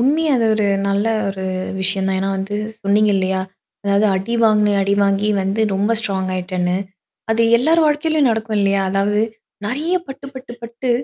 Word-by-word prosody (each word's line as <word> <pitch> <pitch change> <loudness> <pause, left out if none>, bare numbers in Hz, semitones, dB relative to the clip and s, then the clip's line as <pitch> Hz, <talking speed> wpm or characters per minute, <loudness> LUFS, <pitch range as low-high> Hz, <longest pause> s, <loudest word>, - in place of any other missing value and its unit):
உண்மைய 300 +5 +2
அது 230 -2 +2
ஒரு 215 -1 +1 0.2
நல்ல 200 +1 +1 0.2
ஒரு 195 -1 -5 0.4
விஷயம் 190 0 0
தான். 190 0 0
ஏன்னா 195 0 -1
வந்து, 195 +2 -3 0.3
சொன்னீங்க 210 +1 +3
இல்லையா? 190 0 0 0.4
அதாவது, 200 +1 +3
அடி 195 +5 -3
வாங்குனேன். 210 -2 +3
அடிவாங்கி 200 +1 +1
வந்து 195 +3 -1
ரொம்ப 205 +4 +1
ஸ்ட்ராங் 195 -3 -2
ஆயிட்டேன்னு. 180 -1 -1 0.5
அது 225 +1 +2 0.2
எல்லார் 320 +6 +3
வாழ்க்கையிலேயும் 300 -1 +2
நடக்கும் 220 -1 -1
இல்லையா? 195 0 +2
அதாவது 200 +2 +1 0.5
நெறைய 300 - -1
பட்டு, 270 0 -9
பட்டு, 260 -2 -9
பட்டு 235 +2 -4
205 Hz, 160 wpm, -19 LUFS, 195-235 Hz, 0.5 s, சொன்னீங்க